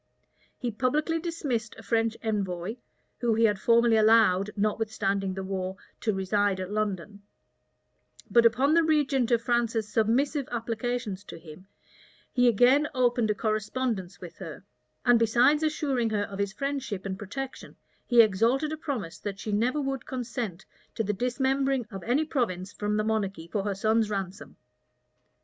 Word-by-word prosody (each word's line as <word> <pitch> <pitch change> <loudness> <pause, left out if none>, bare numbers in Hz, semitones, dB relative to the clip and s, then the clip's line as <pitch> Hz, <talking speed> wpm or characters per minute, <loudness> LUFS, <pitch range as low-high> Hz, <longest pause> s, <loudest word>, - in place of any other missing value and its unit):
He 245 - -3
publicly 295 +8 0
dismissed 290 -10 -3
a 225 - -11
French 225 +2 0
envoy, 200 -1 -2 0.4
whom 235 -3 +1
he 225 - +2
had 210 -3 +3
formerly 235 +1 +4
allowed, 215 -3 +4
notwithstanding 200 -2 -1
the 190 - -4
war, 190 0 -3 0.2
to 220 - 0
reside 195 0 0
at 185 +1 -5
London;[] 205 -1 -3 1.1
but 235 - +5
upon 260 +6 +4
the 335 - +5
regent 285 -6 +2
of 235 -2 +2
France's 235 -3 0
submissive 245 +6 +1
applications 230 -3 -3
to - - -9
him, 165 +3 -13 0.7
he 245 -1 +4
again 250 +6 +5
opened 245 -3 +2
a 210 - +1
correspondence 215 -3 -2
with 175 -2 -10
her; 165 -7 -8 0.4
and 245 -1 +6
besides 245 +6 +4
assuring 285 -6 0
her 210 -2 0
of 200 -1 -7
his 200 -1 0
friendship 265 -4 -4
and 190 0 -4
protection, 265 +6 -7 0.3
he 240 -2 +7
exacted 230 +9 +1
a - - -4
promise 255 - -4
that 200 -2 -5
she 210 - -5
never 240 +8 +1
would 270 -2 -3
consent 235 -7 -4 0.3
to 225 - 0
the 210 0 -1
dismembering 265 +3 0
of 195 -2 -6
any 270 +7 +2
province 195 - -2
from 210 0 -1
the 215 - +1
monarchy 200 -6 -2
for 195 +3 -2
her 200 -1 -1
son's 220 +2 +2
ransom. 195 -1 -5
225 Hz, 155 wpm, -27 LUFS, 200-250 Hz, 1.1 s, he